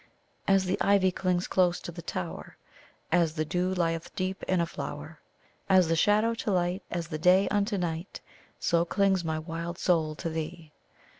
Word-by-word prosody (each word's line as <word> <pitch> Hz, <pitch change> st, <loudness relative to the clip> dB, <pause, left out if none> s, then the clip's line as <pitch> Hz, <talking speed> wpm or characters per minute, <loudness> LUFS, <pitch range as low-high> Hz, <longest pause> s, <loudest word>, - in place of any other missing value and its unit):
"As 195 Hz, -1 st, +4 dB
the 185 Hz, -, -1 dB
ivy 195 Hz, -2 st, +4 dB
clings 180 Hz, -1 st, 0 dB
close 180 Hz, -2 st, +2 dB
to -, -, -6 dB
the 170 Hz, +1 st, -8 dB
tower, 85 Hz, -, -6 dB, 0.5 s
As 165 Hz, -2 st, +2 dB
the 155 Hz, -1 st, -1 dB
dew 180 Hz, +4 st, 0 dB
lieth 165 Hz, -2 st, -1 dB
deep 190 Hz, +1 st, -2 dB
in 185 Hz, -1 st, +2 dB
a 170 Hz, -, +2 dB
flower, 170 Hz, -, -7 dB, 0.5 s
As 185 Hz, -3 st, +5 dB
the 165 Hz, -, +3 dB
shadow 210 Hz, +6 st, +3 dB
to 230 Hz, -, -4 dB
light, 180 Hz, 0 st, 0 dB
as 170 Hz, -2 st, -4 dB
the 155 Hz, -2 st, -4 dB
day 185 Hz, +4 st, +5 dB
unto 205 Hz, 0 st, 0 dB
night, 170 Hz, 0 st, -4 dB, 0.4 s
So 170 Hz, -1 st, +2 dB
clings 190 Hz, +1 st, +1 dB
my 160 Hz, -1 st, -1 dB
wild 165 Hz, +2 st, -5 dB
soul 160 Hz, -5 st, +1 dB
to 165 Hz, -, -5 dB
thee! 160 Hz, 0 st, -5 dB
175 Hz, 175 wpm, -28 LUFS, 165-190 Hz, 0.5 s, As